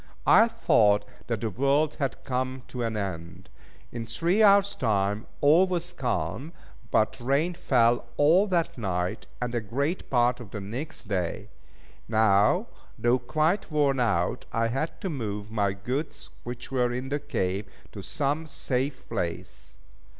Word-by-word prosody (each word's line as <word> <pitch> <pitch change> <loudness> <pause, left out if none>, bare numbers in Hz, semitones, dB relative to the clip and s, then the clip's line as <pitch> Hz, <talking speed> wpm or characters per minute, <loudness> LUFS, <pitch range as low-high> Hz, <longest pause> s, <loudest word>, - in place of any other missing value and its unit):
I 225 - +7
thought 105 - +3 0.2
that 115 -4 -2
the 110 - -1
world 140 +6 +1
had 135 -2 -2
come 130 0 -2
to 125 - -5
an 115 -2 -1
end. 85 -5 -6 0.4
In 115 -1 -5
three 170 - +1
hours' 200 -1 +6
time 105 -2 0
all 160 +6 +6
was 175 -1 -3
calm; 125 - -2 0.4
but 110 +4 +1
rain 140 +8 +1
fell 120 -7 +2
all 170 +8 +5
that 170 -8 0
night, 90 -4 -2
and 125 -1 -3
a 120 - 0
great 140 - -2
part 125 -1 +2
of 120 -5 -9
the 105 - -6
next 115 +6 -6
day. 90 -5 -2 0.6
Now, 110 -2 +3 0.3
though 120 +2 +2
quite 155 +9 0
worn 145 -3 +2
out, 90 -8 0
I 115 0 +1
had 135 +7 -3
to 190 - -2
move 105 -6 -4
my 100 -3 +1
goods 135 +9 -4
which 120 +2 -7
were 125 -2 +1
in 125 +2 -4
the 145 +1 -1
cave, 105 -9 -2 0.2
to - - -8
some 145 +3 -1
safe 135 -1 -3
place. 85 -7 -5
125 Hz, 150 wpm, -27 LUFS, 105-145 Hz, 0.6 s, I